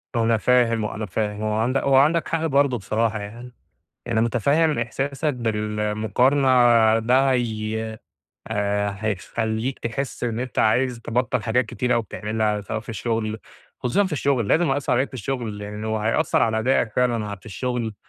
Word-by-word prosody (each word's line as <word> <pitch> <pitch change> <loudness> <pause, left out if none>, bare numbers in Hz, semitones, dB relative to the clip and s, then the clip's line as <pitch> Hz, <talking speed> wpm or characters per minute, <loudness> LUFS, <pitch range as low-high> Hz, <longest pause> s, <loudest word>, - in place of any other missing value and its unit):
أنا 115 -1 +2
فاهم 115 -1 +2
أنا 105 0 -4
فاهم 105 +2 -3
هو 110 0 -1
عندك 120 +5 +1
هو 135 -1 +3
عندك 155 +5 +4
حق 165 0 -1
برضه 140 -4 +2
بصراحة 110 +2 -1
يعني، 120 +4 -9 0.6
أنا 115 -2 +1
متفهم 140 +7 +2
إحساسك 135 +5 -2
بالمقارنة 110 +4 0 0.5
ده 130 +4 +3
ي 110 -3 -1 0.7
آآ 100 -1 -1
هيخلّيك 110 +4 -2
تحس 125 +3 -4
إن 115 -2 -2
أنت 125 -3 -5
عايز 125 +2 +2
تبطّل 120 0 -1
حاجات 115 +3 +1
كتيرة 125 +3 -1
أوي 115 - +1
بتعملها 105 0 -2
سواء 100 - -4
في 115 - -18
الشغل، 110 0 -2 0.4
خصوصًا 160 +12 +1
في 175 - -6
الشغل 135 -6 0
لازم 165 +5 +3
يأثّر 135 +1 0
عليك 130 +3 +2
في - - -15
الشغل، 120 -4 -4
يعني 105 +1 -6
هو 110 0 -1
هيأثر 115 +8 +1
على 110 -1 +1
أدائك 115 -1 +1
فعلًا 115 -5 0
في 95 - -20
الشغل، 115 +1 -3
115 Hz, 160 wpm, -23 LUFS, 110-130 Hz, 0.7 s, عندك